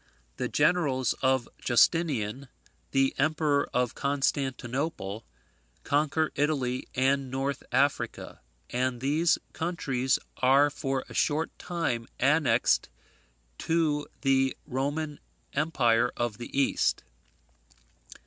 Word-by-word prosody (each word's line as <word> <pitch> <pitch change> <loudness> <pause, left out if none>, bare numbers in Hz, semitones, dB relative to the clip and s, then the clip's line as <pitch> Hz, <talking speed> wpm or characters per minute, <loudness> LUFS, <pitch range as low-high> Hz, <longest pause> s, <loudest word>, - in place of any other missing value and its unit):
The 125 - -1
generals 145 -6 +2
of 130 -1 +2 0.2
Justinian, 130 -3 +2 0.4
the 135 0 +2
Emperor 150 0 +1
of 125 -1 0
Constantinople, 135 - -2 0.6
conquer 150 +2 +1
Italy 135 -4 -1
and 135 +1 +1
North 135 +1 -2
Africa; 135 +3 0 0.3
and 125 0 -1
these 150 +6 +2 0.2
countries 135 -7 0 0.2
are 135 +3 +4
for 135 -1 -2
a - - -11
short 155 +2 +1
time 130 -10 -2
annexed 145 +2 +3 0.7
to 155 -3 0
the 135 -1 +2
Roman 145 +3 -2 0.3
Empire 125 -6 +2
of 120 -3 -2
the 120 - -7
East. 140 - +1
135 Hz, 95 wpm, -28 LUFS, 130-150 Hz, 0.7 s, are